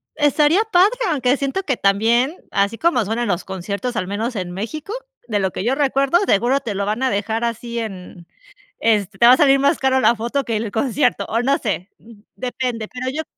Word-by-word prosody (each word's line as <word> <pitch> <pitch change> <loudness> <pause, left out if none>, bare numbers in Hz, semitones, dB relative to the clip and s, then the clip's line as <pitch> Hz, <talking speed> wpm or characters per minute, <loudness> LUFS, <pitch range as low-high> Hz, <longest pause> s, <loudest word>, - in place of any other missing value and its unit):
Estaría 300 +4 +3
padre, 365 +1 +6 0.2
aunque 270 -4 +1
siento 275 +8 -2
que 270 -8 -1
también, 230 - +2 0.2
así 200 +3 0
como 335 -5 +2
suenan 230 +4 -2
los 175 -4 -1
conciertos, 200 +6 -4
al 185 - -2
menos 220 +5 -3
en 180 -3 -4
México, 260 - -5 0.3
de 210 -3 0
lo 190 -1 0
que - - -5
yo 240 +4 +1
recuerdo, 275 +2 +2
seguro 240 +7 +2
te 230 -7 -5
lo 200 +1 -1
van 215 +4 -2
a 265 - +2
dejar 220 +2 -2
así 235 0 -4
en 185 -5 -8 0.5
este, 210 -3 0
te 235 - +6
va 245 - +9
a - - +1
salir 275 -1 +5
más 280 +4 +2
cara 265 0 +2
la 240 - +4
foto 240 +5 -2
que 230 -2 -2
el 215 0 -3
concierto, 250 +1 0
o 230 - -1
no 275 +3 +2
sé, 200 -4 -3 0.5
depende, 245 -3 -3
pero 255 +1 -5
yo 315 +1 -3
235 Hz, 205 wpm, -20 LUFS, 205-275 Hz, 0.5 s, va